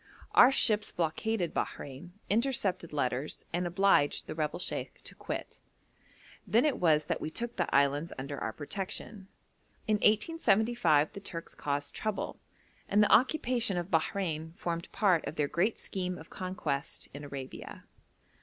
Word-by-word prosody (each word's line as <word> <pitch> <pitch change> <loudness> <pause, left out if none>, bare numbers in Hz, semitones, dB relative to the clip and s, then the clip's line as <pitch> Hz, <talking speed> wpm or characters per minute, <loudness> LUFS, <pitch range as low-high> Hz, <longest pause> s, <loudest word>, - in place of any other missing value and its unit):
Our 245 - +8
ships 215 -6 +2
blockaded 175 +3 -1
Bahrein, 145 +6 -5
intercepted 205 -7 +1
letters, 140 -1 -2
and 175 +1 0
obliged 175 -4 +3
the - - -5
rebel 155 -1 -2
sheikh 180 - -3
to - - -9
quit. - - -6 0.9
Then 225 +8 +4
it 295 - +1
was 155 -3 +4
that 165 0 -2
we - - -2
took 235 +8 -3
the - - 0
islands 140 +3 +2
under 140 +1 -5
our 110 - -2
protection. 190 - -5 0.6
In 215 -1 +2
1875 215 - +3
the - - -6
Turks 170 -4 -6
caused 145 0 -3
trouble, 215 -2 -3 0.5
and 210 +1 +5
the - - +4
occupation 245 - +3
of 175 +2 -3
Bahrein 160 -1 -1
formed 170 -1 -3
part 185 -6 +3
of - - -5
their 150 -3 +1
great 185 +9 +1
scheme 180 -2 -3
of 160 - -13
conquest 165 -6 -3
in 145 +1 -8
Arabia. 140 -2 -8
175 Hz, 145 wpm, -31 LUFS, 150-210 Hz, 0.9 s, Our